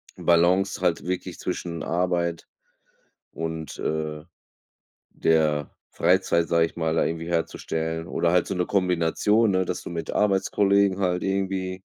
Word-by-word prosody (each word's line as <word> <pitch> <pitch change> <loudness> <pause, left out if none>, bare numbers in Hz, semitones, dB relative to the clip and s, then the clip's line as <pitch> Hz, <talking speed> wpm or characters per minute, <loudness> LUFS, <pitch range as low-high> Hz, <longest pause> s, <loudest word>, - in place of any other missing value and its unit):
Balance 90 +3 +2
halt 90 -2 0
wirklich 90 0 -4
zwischen 85 -2 -4
Arbeit 85 -1 -1 0.8
und, 80 -1 -5
äh, 75 -1 -3 0.9
der 75 -3 +1 0.2
Freizeit, 90 -2 +2
sage 85 0 +3
ich - - -12
mal, 80 -1 0
da - - +2
irgendwie 80 0 -3
herzustellen. 80 -1 -2
Oder 85 0 +1
halt 90 -2 +3
so 100 - -3
'ne 90 -1 0
Kombination, 95 +4 +2
ne, 95 -1 +2
dass 90 - -4
du - - -8
mit 85 -1 -4
Arbeitskollegen 100 -1 +2
halt 90 -2 0
irgendwie 95 -1 -2
85 Hz, 135 wpm, -25 LUFS, 80-95 Hz, 0.9 s, sage